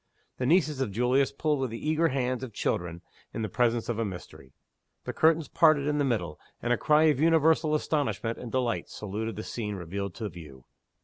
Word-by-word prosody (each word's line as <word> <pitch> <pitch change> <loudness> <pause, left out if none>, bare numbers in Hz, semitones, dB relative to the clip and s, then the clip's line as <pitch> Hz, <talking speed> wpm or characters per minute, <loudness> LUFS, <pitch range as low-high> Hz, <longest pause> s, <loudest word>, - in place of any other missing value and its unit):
The 125 - 0
nieces 155 -3 +2
of 130 - 0
Julius 125 +5 +2
pulled 150 -2 0
with 130 -1 -1
the 115 +6 -6
eager 160 +2 +3
hands 130 -3 -1
of 120 -4 -7
children 85 -3 -2 0.3
in 115 - -2
the - - -1
presence 120 +2 +1
of 115 -1 -2
a - - +1
mystery 90 - -8 0.5
the - - -5
curtains 160 -1 +3
parted 155 -2 +4
in 150 0 0
the - - +2
middle, 90 - -2 0.2
and 120 +1 0
a - - +1
cry 155 0 +4
of 150 -4 +3
universal 160 -1 +3
astonishment 145 -7 -1
and 120 - -7
delight 125 -3 -1
saluted 105 +1 -5
the 110 - -5
scene 105 -3 -4
revealed 95 +1 -5
to 110 - -4
view. 75 -9 -12
125 Hz, 200 wpm, -28 LUFS, 105-150 Hz, 0.5 s, parted